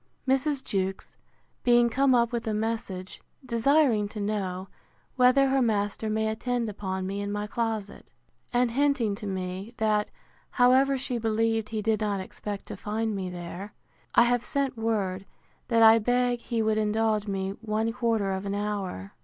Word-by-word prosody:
Mrs. 270 +1 +1
Jewkes 190 -1 -3 0.5
being 240 -1 +5
come 265 +2 +3
up 235 -1 +3
with 235 -1 -3
a 215 - 0
message, 210 -4 -4 0.2
desiring 240 -2 +3
to 210 +1 -8
know, 195 -3 -2 0.5
whether 260 +2 +5
her 270 0 +2
master 215 -1 0
may 220 0 0
attend 235 +2 -1
upon 190 -2 -4
me 200 +2 -3
in 200 0 -3
my 205 0 -2
closet; 220 -2 -3 0.4
and 245 -1 +2
hinting 275 -4 +1
to 205 +1 -6
me, 190 +3 -5
that, 215 -1 +1 0.4
however, 265 +2 +4
she 255 -2 -3
believed 225 0 0
he 220 -1 -3
did 220 0 +1
not 205 -2 0
expect 200 +2 -6
to - - -7
find 220 +1 -2
me 190 -2 -3
there; 180 +3 -7 0.4
I - - +8
have 245 0 +1
sent 275 -2 -1
word, 200 -4 -2 0.4
that 230 -1 +4
I 225 +1 +8
beg 245 +2 +1
he 230 -1 -2
would 215 0 +1
indulge 215 0 +1
me 195 -1 -2
one 220 0 -1
quarter 225 -5 0
of 190 +1 -3
an 200 - -2
hour. 200 - -4
220 Hz, 165 wpm, -27 LUFS, 200-240 Hz, 0.5 s, I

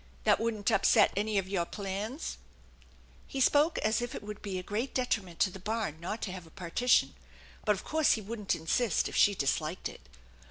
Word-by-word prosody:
That - - +4
wouldn't 225 -2 0
upset 200 - +5
any 210 +1 0
of 190 -1 0
your 190 -3 0
plans? 205 - -5 0.4
" - - -28 0.2
He 275 - -5
spoke 295 +5 +4
as 220 +3 +2
if 240 - -4
it - - -6
would 210 0 -7
be 195 -3 -4
a 180 - -4
great 220 +8 -3
detriment 205 -9 -1
to 190 - +4
the 190 - -9
barn 210 -5 -3
not 210 +7 -4
to 190 - -3
have 180 -3 -8
a - - -15
partition, 185 +10 +2 0.5
but 210 -2 +4
of 190 - -8
course 315 -1 +3
he 220 - -2
wouldn't 210 -1 -2
insist 175 +5 +1
if - - -7
she 205 - +5
disliked 155 +3 -1
it. - - -11
205 Hz, 205 wpm, -31 LUFS, 185-230 Hz, 0.5 s, upset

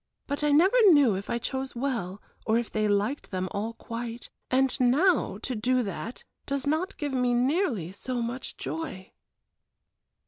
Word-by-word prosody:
But 285 +1 -3
I 295 - +3
never 340 +10 +5 0.2
knew 285 -8 +6
if 195 +1 -5
I - - 0
chose 265 +2 -4
well 235 -7 -3 0.2
or 220 +1 +4
if 235 -1 -2
they 215 -1 +1
liked 205 +7 0
them 185 -1 -2
all 215 +3 -3
quite, 230 0 -7 0.2
and 260 0 +2
now 270 - +3
to 260 - -2
do 250 +3 +1
that 225 +3 -6 0.2
does 280 -1 -1
not 315 +6 -1
give 290 -2 -3
me 250 -1 +2
nearly 250 - +1
so 245 +5 -4
much 240 +2 -4
joy." 315 - -5
250 Hz, 165 wpm, -27 LUFS, 220-280 Hz, 0.2 s, knew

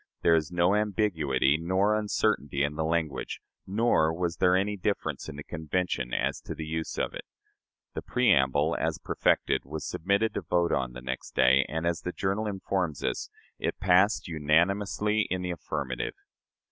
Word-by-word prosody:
There 85 - +5
is 80 -1 +1
no 90 +2 +3
ambiguity 80 -10 +1
nor 95 +5 +2
uncertainty 100 -10 0
in 70 +1 0
the 80 +1 -2
language; 80 -2 -2 0.3
nor 100 -6 +2
was 85 0 -2
there 90 0 +4
any 100 +2 +1
difference 90 -7 -2
in - - -7
the 75 - -7
Convention 80 -6 -2
as - - -1
to - - -7
the 80 - -5
use 80 +1 -4
of - - -1
it. - - -6 0.7
The - - -4
preamble, 75 - +2
as - - -1
perfected, - - +1
was 75 +2 -6
submitted 100 +6 0
to - - -2
vote 85 -1 +1
on 65 -3 -1
the 60 0 -9
next 65 0 -5
day, 65 +2 +5
and, 80 +2 -2
as 85 0 0
the 90 - -3
journal 100 +3 -1
informs 95 -6 -2
us, - - -2 0.3
"it - - -2
passed 95 +1 +3
unanimously 95 +7 +1
in 90 0 -2
the 90 - -2
affirmative." 75 -6 -4
85 Hz, 170 wpm, -28 LUFS, 75-100 Hz, 0.7 s, There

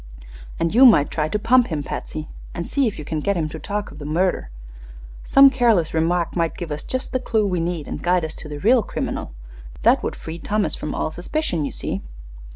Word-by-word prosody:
"And 165 0 0
you 245 +4 +6
might 205 - +6
try 155 -1 -1
to 210 - 0
pump 245 +3 +4
him, 155 -4 -3
Patsy, 155 +2 -5 0.3
and 170 -1 -4
see 275 -2 +1
if 215 - -4
you 150 - -7
can 155 0 -2
get 200 +5 0
him 160 -2 0
to 160 - -7
talk 205 +3 -4
of 145 - -12
the 145 - -7
murder. 170 - 0 0.7
Some 275 0 +7
careless 230 - +2
remark 165 +1 0
might 165 -2 0
give 170 -4 -6
us 150 - -3
just 255 0 -4
the 255 - 0
clue 220 -4 0
we 180 -3 0
need 165 -2 -2
and - - -5
guide 180 -1 +2
us 160 - -5
to 155 - -8
the 150 - -5
real 230 - +4
criminal. 60 - -4 0.5
That - - +5
would - - -3
free 165 +1 -8
Thomas 210 +4 0
from 150 - -4
all 155 - -2
suspicion, 175 - -2
you - - -4
see." 95 - -3
175 Hz, 225 wpm, -22 LUFS, 155-215 Hz, 0.7 s, Some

